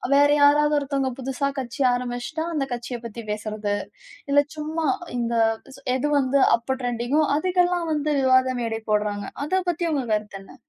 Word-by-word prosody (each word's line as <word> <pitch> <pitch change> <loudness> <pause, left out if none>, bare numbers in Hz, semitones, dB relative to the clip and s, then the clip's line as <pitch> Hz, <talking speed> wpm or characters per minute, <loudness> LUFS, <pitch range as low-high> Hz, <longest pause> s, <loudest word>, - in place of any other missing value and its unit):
வேற 285 +1 +6
யாராவது 295 +1 +5
ஒருத்தவங்க 275 -2 -1
புதுசா 270 +2 -2
கட்சி 245 +1 -5
ஆரம்பிச்சுட்டா 245 +6 -3
அந்த 290 -4 0
கட்சியை 240 0 -5
பத்தி 230 0 -7
பேசுறது, 210 -1 -2 0.6
இல்ல 285 - +6 0.2
சும்மா 310 +1 -2 0.3
இந்த 235 0 -1 0.4
சு 275 - -16
எது 260 +3 0
வந்து 270 +1 +2 0.2
அப்ப 260 +3 -3
ட்ரெண்டிங்கோ 245 +5 0
அதுக்கெல்லாம் 355 0 +1
வந்து 300 0 0
விவாத 260 -1 +3
மேடை 225 -1 -2
போடுறாங்க. 205 -1 0 0.2
அத 375 +5 +1
பத்தி 345 0 -1
உங்க 275 -5 -1
கருத்து 210 -2 -3
என்ன? 195 - -15
260 Hz, 155 wpm, -24 LUFS, 235-295 Hz, 0.6 s, வேற